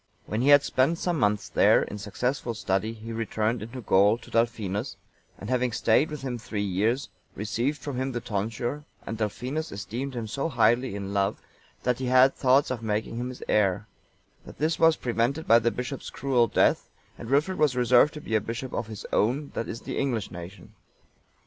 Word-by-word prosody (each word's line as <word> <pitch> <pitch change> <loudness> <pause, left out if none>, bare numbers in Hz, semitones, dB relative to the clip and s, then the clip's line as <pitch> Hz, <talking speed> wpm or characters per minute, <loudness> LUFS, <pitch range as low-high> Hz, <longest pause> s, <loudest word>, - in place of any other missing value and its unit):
When 110 +2 -2
he 130 - +1
had 145 0 +7
spent 135 +6 +1
some 175 -3 -1
months 105 -2 +1
there, - - +4
in 105 - -7
successful 120 +4 -2
study, 105 +1 -1
he 115 +1 -8
returned 115 +1 -1
into 115 +4 -7
Gaul, 100 +1 +4
to 120 - -15
Dalfinus;(900) 115 -1 -1 0.4
and 105 +5 -6
having 125 -1 +1
stayed 115 +5 +2
with 150 -3 -7
him 125 -3 -3
three 105 -2 -3
years, 105 +8 0 0.3
received 115 +8 -1
from 135 -1 -5
him 130 +1 -1
the 120 - -3
tonsure, 115 +6 -3 0.2
and 115 - -4
Dalfinus 130 +8 -3
esteemed 120 +7 -5
him 115 -2 -3
so 135 +8 -2
highly 125 -3 +2
in 100 0 -5
love 100 -1 0 0.4
that 125 0 0
he 130 - -2
had 130 +1 +6
thoughts 130 +1 +3
of 125 -3 -3
making 110 +1 -2
him 125 +1 -3
his 130 - -8
heir; 100 -1 +2 0.6
but - - -13
this 155 +2 0
was 165 -1 +6
prevented 125 +6 -1
by 115 - +7
the 115 0 +2
bishop's 125 +3 -5
cruel 125 -4 +1
death, - - +2 0.3
and 115 - -9
Wilfrid 150 +8 +1
was 150 -4 +3
reserved 125 +4 +4
to 150 - -7
be 110 - -6
a 110 - +3
bishop 115 +4 -5
of 115 - -2
his 110 -2 -8
own, 135 +7 +1
that 115 - -3
is, 115 - -6
the - - -4
English, 120 -7 -1
nation. 90 +4 -10
120 Hz, 195 wpm, -27 LUFS, 105-130 Hz, 0.6 s, had